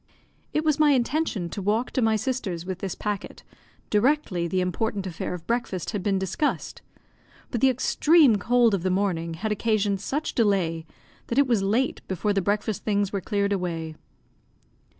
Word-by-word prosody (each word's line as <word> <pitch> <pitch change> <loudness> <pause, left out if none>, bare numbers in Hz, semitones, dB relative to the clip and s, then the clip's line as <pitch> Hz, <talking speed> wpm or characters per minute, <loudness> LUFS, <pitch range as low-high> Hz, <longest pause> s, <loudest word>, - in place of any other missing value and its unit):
It 305 - 0
was 305 -1 +2
my 300 -2 +5
intention 250 - 0
to 200 - -5
walk 215 +5 0
to 260 - 0
my 220 -1 +3
sister's 215 -7 -2
with 185 -1 -4
this 190 -2 -4
packet, 205 -2 -5 0.5
directly 210 - +1
the 185 +2 0
important 195 +2 -1
affair 180 0 -4
of 170 -2 -10
breakfast 230 -7 -2
had 205 -4 -3
been 195 0 +1
discussed; 190 - -2 0.7
but 235 - -2
the 270 - +6
extreme 275 0 +4
cold 235 +1 +3
of 195 - +1
the 185 - 0
morning 180 -4 -1
had 215 +6 -3
occasioned 210 -2 0
such 295 +8 -2
delay 180 -8 +1 0.4
that 235 - -3
it 280 - +6
was 235 -6 +2
late 220 +7 0
before 200 +3 -1
the 195 - +1
breakfast 205 +2 -1
things 205 -2 0
were 200 - -1
cleared 200 +1 0
away. 165 -4 -3
205 Hz, 170 wpm, -25 LUFS, 185-240 Hz, 0.7 s, the